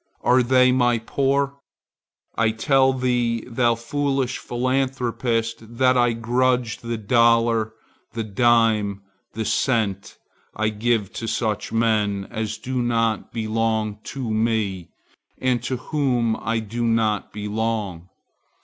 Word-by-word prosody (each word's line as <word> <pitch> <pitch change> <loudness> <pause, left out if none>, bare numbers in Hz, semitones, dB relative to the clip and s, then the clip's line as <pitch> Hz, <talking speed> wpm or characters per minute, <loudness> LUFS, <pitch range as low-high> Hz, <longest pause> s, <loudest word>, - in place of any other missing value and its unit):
Are 125 +2 +4
they 125 +1 +4
my 120 -2 +3
poor? 140 +4 0 0.8
I 115 -1 +2
tell 130 +4 +3
thee 125 -3 0
thou 120 -1 +2
foolish 135 +2 -1
philanthropist 120 -3 -2
that 130 0 +4
I 120 -1 +3
grudge 125 +1 0
the 115 0 -4
dollar, 115 0 +3 0.4
the 115 -1 -2
dime, 110 -2 +2 0.3
the 110 +1 -3
cent, 105 -7 0 0.4
I 110 +1 +1
give 110 -1 -1
to 115 - -5
such 110 -1 -2
men 105 -3 +1
as 110 -1 -3
do 130 -1 -3
not 115 -2 0
belong 110 -1 -1
to 135 -3 -5
me 110 -5 -1 0.5
and 125 -2 0
to 130 +1 -2
whom 125 -5 0
I 115 +3 -1
do 115 +3 -4
not 115 -2 +1
belong. 105 -4 -3
115 Hz, 120 wpm, -23 LUFS, 110-125 Hz, 0.8 s, Are